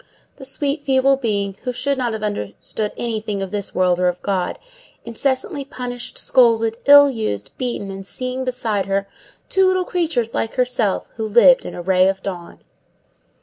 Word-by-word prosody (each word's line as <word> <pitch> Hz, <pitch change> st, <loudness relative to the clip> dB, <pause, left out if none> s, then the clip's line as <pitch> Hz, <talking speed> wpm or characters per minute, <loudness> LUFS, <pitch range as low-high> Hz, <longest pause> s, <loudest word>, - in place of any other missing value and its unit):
The 270 Hz, -, -7 dB
sweet, 280 Hz, +2 st, -1 dB
feeble 270 Hz, -1 st, +3 dB
being, 200 Hz, -6 st, -2 dB
who 250 Hz, -, -2 dB
should 255 Hz, +3 st, -1 dB
not 240 Hz, -3 st, -1 dB
have 220 Hz, -1 st, -5 dB
understood 205 Hz, -, -3 dB
anything 215 Hz, -4 st, -3 dB
of 190 Hz, -, -6 dB
this 205 Hz, -2 st, -4 dB
world 180 Hz, -1 st, +2 dB
or 180 Hz, -, +2 dB
of 180 Hz, 0 st, -1 dB
God, 190 Hz, -3 st, -1 dB, 0.5 s
incessantly 275 Hz, -, -2 dB
punished, 245 Hz, -2 st, -7 dB
scolded, 230 Hz, -2 st, +3 dB
ill 285 Hz, 0 st, +9 dB
used, 215 Hz, -, -3 dB
beaten, 235 Hz, -6 st, -3 dB
and 195 Hz, 0 st, -7 dB
seeing 255 Hz, +5 st, -4 dB
beside 230 Hz, -6 st, -1 dB
her 195 Hz, 0 st, -1 dB, 0.4 s
two 380 Hz, -1 st, +3 dB
little 370 Hz, -1 st, +1 dB
creatures 310 Hz, -12 st, -1 dB
like 225 Hz, -, -2 dB
herself, 245 Hz, -5 st, 0 dB
who 220 Hz, -1 st, -2 dB
lived 465 Hz, -, +5 dB
in -, -, -7 dB
a 175 Hz, -, -6 dB
ray 185 Hz, 0 st, +4 dB
of 195 Hz, 0 st, -1 dB
dawn! 180 Hz, -3 st, -7 dB
230 Hz, 170 wpm, -20 LUFS, 195-260 Hz, 0.5 s, ill